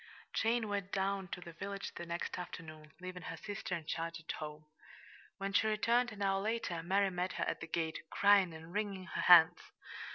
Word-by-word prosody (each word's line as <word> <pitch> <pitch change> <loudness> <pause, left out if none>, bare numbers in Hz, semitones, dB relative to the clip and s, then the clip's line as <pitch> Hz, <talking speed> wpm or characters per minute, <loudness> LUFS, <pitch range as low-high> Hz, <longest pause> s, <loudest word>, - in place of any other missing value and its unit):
Jane 230 0 +1
went 200 -1 -2
down 195 0 0
to 180 - -6
the 170 -1 -9
village 200 +3 -5
the 175 - -7
next 170 +1 -3
afternoon, 155 -3 -8
leaving 185 0 -7
her - - -6
sister 200 -3 -4
in 165 -2 -6
charge 165 +1 -3
at 165 - -5
home. 150 0 -7 0.7
When 195 0 -3
she 220 - +4
returned, 235 +3 +2
an 205 -2 -5
hour 195 0 +2
later, 215 -5 -1
Mary 195 +3 +2
met 180 +1 -2
her - - -1
at - - -2
the 165 - -5
gate, 160 -1 -1
crying 200 -3 +5
and 160 +1 -10
wringing 200 -3 -2
her - - -3
hands. 175 0 +8
185 Hz, 195 wpm, -35 LUFS, 165-200 Hz, 0.7 s, hands